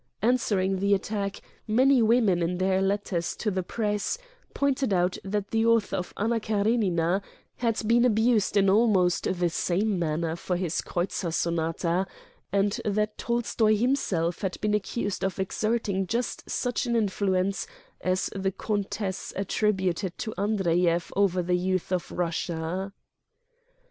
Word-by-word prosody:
Answering 200 -6 +2
the 200 +1 +3
attack, 200 0 -3 0.3
many 255 +4 +4
women, 220 -6 +3
in 175 +1 0
their 190 +1 +2
letters 195 -3 -1
to 215 - -1
the 185 -1 -1
press, 210 - -1 0.4
pointed 275 -4 +1
out 180 -1 +1
that 200 0 -3
the 225 0 +2
author 230 -3 +3
of 180 - -3
"Anna 230 +3 +1
Karenina" 200 -5 +1 0.4
had 230 -2 -1
been 235 +1 +4
abused 220 -3 +3
in 195 -1 +4
almost 195 -3 +3
the 175 -1 0
same 190 +4 0
manner 160 0 -1
for 175 +1 -2
his 175 -2 -1
"Kreutzer 175 0 -2
Son 170 +1 0
ata," 170 +3 0 0.4
and 200 +1 +1
that 210 0 0
Tolstoy 230 -2 +1
himself 205 -8 0
had 190 -2 -3
been 210 0 0
accused 205 -1 -2
of 190 -1 -1
exerting 200 0 -1
just 235 +4 -3
such 245 +1 -1
an 235 - +1
influence 195 -3 0 0.4
as 185 +1 0
the 195 0 0
Countess 200 -1 -3
attributed 190 -2 0
to 220 - -4
Andreyev 175 -4 +1
over 185 -3 +2
the 180 +1 0
youth 185 0 -1
of 180 -2 -1
Russia. 170 +2 -2
195 Hz, 140 wpm, -27 LUFS, 180-215 Hz, 0.4 s, many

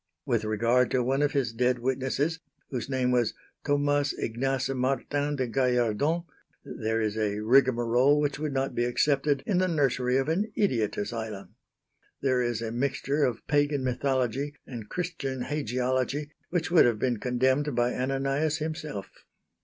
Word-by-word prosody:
With 120 -6 +1
regard 115 +4 +2
to 125 -1 +1
one 135 +3 +1
of 145 -1 +1
his 130 -5 0
dead 125 +2 +2
witnesses 135 +5 -1 0.3
whose 125 -1 -3
name 130 -2 +1
was 120 -3 +1 0.3
Thomas 145 -1 +1
Ignace 130 +4 -1
Martin 135 +3 -1
de 130 -2 0
Gallardon, 125 +5 +1 0.4
there 110 +1 -2
is 110 -1 -1
a 105 -2 -1
rigmarole 125 +3 +4
which 145 -1 -1
would 155 -1 -2
not 135 0 -1
be 120 - 0
accepted 140 +3 +1
in 185 -4 +1
the 185 - +2
nursery 130 -6 +1
of 135 +1 0
an 200 +7 0
idiot 115 - +1
asylum. 110 -2 -5 0.7
There 130 -2 +1
is 120 -2 -1
a 110 - -3
mixture 140 +4 0
of 120 -4 -1
Pagan 145 -1 +1
mythology 130 +2 -1
and 115 -5 -8
Christian 165 -8 -3
hagiology 130 +1 -1 0.2
which 175 -1 -1
would 175 - +7
have 120 -3 +2
been 120 +1 0
condemned 130 +3 +1
by 120 +1 +2
Ananias 135 +4 0
himself. 155 - -5
130 Hz, 155 wpm, -28 LUFS, 120-145 Hz, 0.7 s, would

